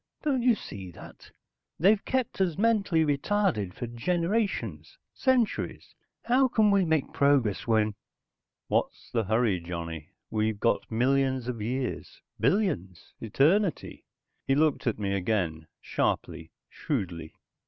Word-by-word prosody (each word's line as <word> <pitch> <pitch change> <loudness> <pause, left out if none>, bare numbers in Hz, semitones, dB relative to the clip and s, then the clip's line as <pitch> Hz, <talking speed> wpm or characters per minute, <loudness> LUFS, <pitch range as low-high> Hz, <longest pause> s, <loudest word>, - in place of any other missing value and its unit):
Don't 275 -5 +1
you 240 -1 +4
see 95 - -8
that? 85 - -13 0.5
They've 200 +5 +4
kept 255 -6 -1
us 175 -5 +1
mentally 200 -7 +2
retarded 145 - 0
for - - -4
generations, 180 - -2 0.2
centuries. 255 -4 0 0.3
How 260 +2 +3
can 220 -4 +3
we 195 -2 +3
make 160 -4 0
progress 140 -9 +2
when...." 110 -2 +2 0.7
"What's - - -2
the 115 -3 0
hurry, 110 -2 +1
Johnny? 85 -2 -6 0.2
We've 110 -1 0
got 115 - +1
millions 130 +1 +1
of 120 -3 -4
years, 125 +4 -4 0.2
billions, 95 - -1
eternity." 160 - +1 0.4
He 135 - +3
looked 150 -3 +1
at 115 - +1
me 100 -2 -2
again, 90 -5 -1
sharply, 80 - -2 0.2
shrewdly. 90 - -4
135 Hz, 120 wpm, -28 LUFS, -, 0.7 s, you